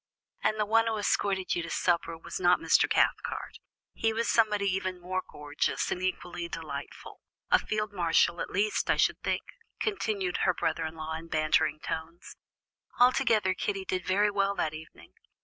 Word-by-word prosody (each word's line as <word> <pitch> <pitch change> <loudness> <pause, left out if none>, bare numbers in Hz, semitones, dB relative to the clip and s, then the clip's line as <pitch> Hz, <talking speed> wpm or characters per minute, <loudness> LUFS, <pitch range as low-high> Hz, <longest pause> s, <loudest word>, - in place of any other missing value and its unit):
"And 215 - 0
the 210 - +2
one 225 +2 +3
who 220 -1 0
escorted 200 -2 0
you 175 - -1
to 170 - -6
supper 170 -2 0
was 165 - -7
not 180 0 +5
Mr. - - +3
Cathcart; - - 0 0.3
he 225 - 0
was 230 +1 -1
somebody 210 -3 +2
even 185 -1 -1
more 185 +1 -2
gorgeous 145 0 -2
and 180 - -2
equally 175 -2 -3
delightful 150 -4 -7 0.3
a - - +7
field 210 -1 -3
marshal, 170 -1 +2
at - - -4
least, 210 +3 0
I - - +3
should - - +2
think," - - -1 0.4
continued 215 - -1
her 180 -2 +2
brother 160 0 -1
in 160 - -9
law 160 0 -5
in 160 +1 -6
bantering 155 -1 +1
tones; 160 +3 -6 0.6
"altogether, 245 -6 +4
Kitty 195 0 -3
did 185 -1 -2
very 205 +3 +2
well 200 0 +1
that 155 -4 -1
evening. 155 0 -12
185 Hz, 170 wpm, -29 LUFS, 165-210 Hz, 0.6 s, a